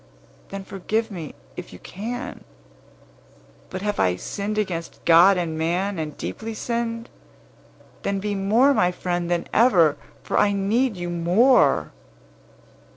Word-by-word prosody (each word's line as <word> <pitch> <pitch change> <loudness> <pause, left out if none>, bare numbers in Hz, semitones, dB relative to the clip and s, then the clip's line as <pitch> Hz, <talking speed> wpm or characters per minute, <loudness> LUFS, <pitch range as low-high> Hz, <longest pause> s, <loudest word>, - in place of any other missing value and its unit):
Then 195 0 -6
forgive 215 +4 -2
me, 165 -6 -7 0.2
if - - -8
you 90 - -10
can. 240 - -6 1.3
But, 185 +1 -6
have 210 -1 -2
I 90 -1 +3
sinned 205 - -4
against 175 -6 -3
God 175 +3 +7
and 170 -3 -2
man, 180 +4 -1
and 155 -2 -5
deeply 220 - -5
sinned? 230 0 -3 0.9
Then 200 0 -1
be 205 +1 -2
more 220 +8 +3
my 180 -8 +2
friend 175 -1 -3
than 175 -1 0
ever, 180 - +4 0.3
for - - 0
I 205 - +3
need 210 +3 +1
you 175 0 -4
more." 180 +10 +3
195 Hz, 135 wpm, -23 LUFS, 175-220 Hz, 1.3 s, God